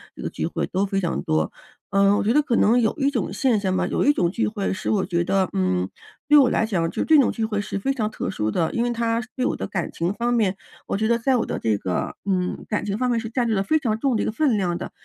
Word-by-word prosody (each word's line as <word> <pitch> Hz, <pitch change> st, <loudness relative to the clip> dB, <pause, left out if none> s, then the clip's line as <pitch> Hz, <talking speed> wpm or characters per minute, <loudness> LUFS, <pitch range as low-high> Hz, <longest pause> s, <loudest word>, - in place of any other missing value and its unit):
这 -, -, -10 dB
个 -, -, -3 dB
聚 -, -, -3 dB
会 -, -, -2 dB
都 190 Hz, +2 st, -1 dB
非 195 Hz, 0 st, -1 dB
常 175 Hz, -, -1 dB
多。 80 Hz, 0 st, 0 dB, 0.4 s
嗯， 195 Hz, +1 st, +4 dB
我 -, -, 0 dB
觉 225 Hz, +4 st, +2 dB
得 300 Hz, -, +5 dB
可 245 Hz, -5 st, -1 dB
能 235 Hz, +4 st, +4 dB
有 220 Hz, -, +1 dB
一 280 Hz, -1 st, +1 dB
种 235 Hz, -10 st, -2 dB
现 240 Hz, -1 st, +2 dB
象 190 Hz, -2 st, -1 dB
吧， 185 Hz, -, +1 dB
有 -, -, 0 dB
一 290 Hz, -, +5 dB
种 175 Hz, -9 st, +1 dB
聚 230 Hz, -, 0 dB
会， 210 Hz, -3 st, -2 dB
是 190 Hz, -, -4 dB
我 200 Hz, -3 st, +1 dB
觉 170 Hz, -1 st, 0 dB
得， 190 Hz, +1 st, +1 dB
嗯， 90 Hz, -1 st, 0 dB, 0.4 s
对 295 Hz, -, +5 dB
我 260 Hz, -3 st, +5 dB
来 -, -, +1 dB
讲 175 Hz, -7 st, 0 dB
就 -, -, -2 dB
这 310 Hz, -2 st, +6 dB
种 265 Hz, -, +3 dB
聚 225 Hz, -, -2 dB
会 210 Hz, -2 st, -1 dB
是 205 Hz, -, -4 dB
非 270 Hz, +8 st, 0 dB
常 220 Hz, -5 st, -1 dB
特 215 Hz, -, -4 dB
殊 110 Hz, -, -2 dB
的。 160 Hz, +8 st, 0 dB
因 235 Hz, -, 0 dB
为 245 Hz, -, 0 dB
它 230 Hz, 0 st, 0 dB
对 255 Hz, -, -1 dB
我 -, -, 0 dB
的 -, -, -4 dB
感 180 Hz, -4 st, -3 dB
情 170 Hz, +2 st, -1 dB
方 235 Hz, +4 st, -1 dB
面， 200 Hz, -5 st, +1 dB, 0.3 s
我 -, -, -1 dB
觉 220 Hz, +1 st, 0 dB
得 235 Hz, +1 st, +2 dB
在 260 Hz, +2 st, +2 dB
我 240 Hz, -, +1 dB
的 -, -, -3 dB
这 110 Hz, -2 st, +1 dB
个 90 Hz, -2 st, -3 dB
嗯， 185 Hz, -2 st, -1 dB
感 210 Hz, -, -1 dB
情 205 Hz, 0 st, -2 dB
方 250 Hz, +1 st, 0 dB
面 235 Hz, -, +1 dB
是 225 Hz, -, -5 dB
占 240 Hz, +1 st, 0 dB
据 225 Hz, -, +1 dB
了 195 Hz, -, +1 dB
非 310 Hz, +11 st, +2 dB
常 225 Hz, -7 st, -1 dB
重 265 Hz, -2 st, +1 dB
的 215 Hz, -, 0 dB
一 -, -, -2 dB
个 -, -, -1 dB
分 250 Hz, -1 st, +1 dB
量 180 Hz, -3 st, 0 dB
的。 -, -, -6 dB
210 Hz, 325 characters per minute, -23 LUFS, 185-240 Hz, 0.4 s, 这